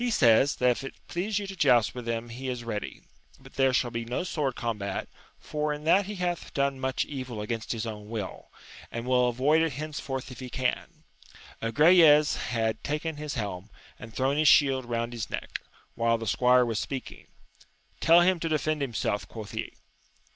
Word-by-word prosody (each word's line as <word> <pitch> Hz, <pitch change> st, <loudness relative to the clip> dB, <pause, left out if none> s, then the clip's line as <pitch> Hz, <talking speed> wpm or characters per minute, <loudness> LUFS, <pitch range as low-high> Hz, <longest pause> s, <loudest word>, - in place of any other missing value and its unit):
says, 135 Hz, -, +4 dB
that 125 Hz, 0 st, +3 dB
if 125 Hz, -, -3 dB
it 135 Hz, -, -7 dB
please 195 Hz, +4 st, -2 dB
you 205 Hz, -, -2 dB
to 195 Hz, 0 st, -7 dB
joust 125 Hz, -, +4 dB
with 125 Hz, -1 st, -7 dB
him 115 Hz, 0 st, -3 dB
he 130 Hz, +3 st, -5 dB
is 125 Hz, -1 st, -4 dB
ready, 110 Hz, -3 st, -5 dB, 0.4 s
but 135 Hz, 0 st, -16 dB
there 135 Hz, -1 st, +3 dB
shall 125 Hz, -1 st, +1 dB
be 115 Hz, 0 st, -3 dB
no 120 Hz, +7 st, -3 dB
sword 150 Hz, -8 st, -2 dB
combat, 105 Hz, -5 st, -3 dB, 0.3 s
for 150 Hz, 0 st, -3 dB
in 150 Hz, 0 st, -5 dB
that 185 Hz, +5 st, +3 dB
he 210 Hz, -, -5 dB
hath 180 Hz, -2 st, -3 dB
done 140 Hz, -1 st, 0 dB
much 130 Hz, -1 st, -1 dB
evil 130 Hz, -6 st, -6 dB
against 110 Hz, +1 st, -4 dB
his 115 Hz, -1 st, -2 dB
own 105 Hz, -2 st, -7 dB
will, 110 Hz, -4 st, -6 dB, 0.4 s
and 115 Hz, +1 st, -5 dB
will 125 Hz, -1 st, +3 dB
avoid 140 Hz, +7 st, +3 dB
it 165 Hz, -3 st, 0 dB
henceforth 135 Hz, -3 st, -5 dB
if 125 Hz, -, -10 dB
he 130 Hz, -1 st, -7 dB
can. 130 Hz, 0 st, -3 dB, 0.6 s
Agrayes 150 Hz, +4 st, +6 dB
had 110 Hz, -1 st, -2 dB
taken 150 Hz, +1 st, -3 dB
his 150 Hz, 0 st, -5 dB
helm 100 Hz, -3 st, -4 dB, 0.3 s
and 115 Hz, -, -10 dB
thrown 135 Hz, +4 st, 0 dB
his 155 Hz, 0 st, +3 dB
shield 135 Hz, -4 st, +5 dB
round 115 Hz, 0 st, -2 dB
his 115 Hz, -2 st, -4 dB
neck, -, -, -5 dB, 0.3 s
while 115 Hz, 0 st, +1 dB
the 115 Hz, -, -6 dB
squire 125 Hz, +3 st, +4 dB
was 115 Hz, -3 st, -1 dB
speaking: 135 Hz, -2 st, -6 dB, 0.7 s
tell 170 Hz, +2 st, +6 dB
him 180 Hz, 0 st, +3 dB
to 165 Hz, -, -2 dB
defend 155 Hz, -1 st, 0 dB
himself! 115 Hz, -5 st, -2 dB
quoth 110 Hz, -2 st, -8 dB
he. 110 Hz, -, -4 dB
130 Hz, 190 wpm, -28 LUFS, 115-150 Hz, 0.7 s, Agrayes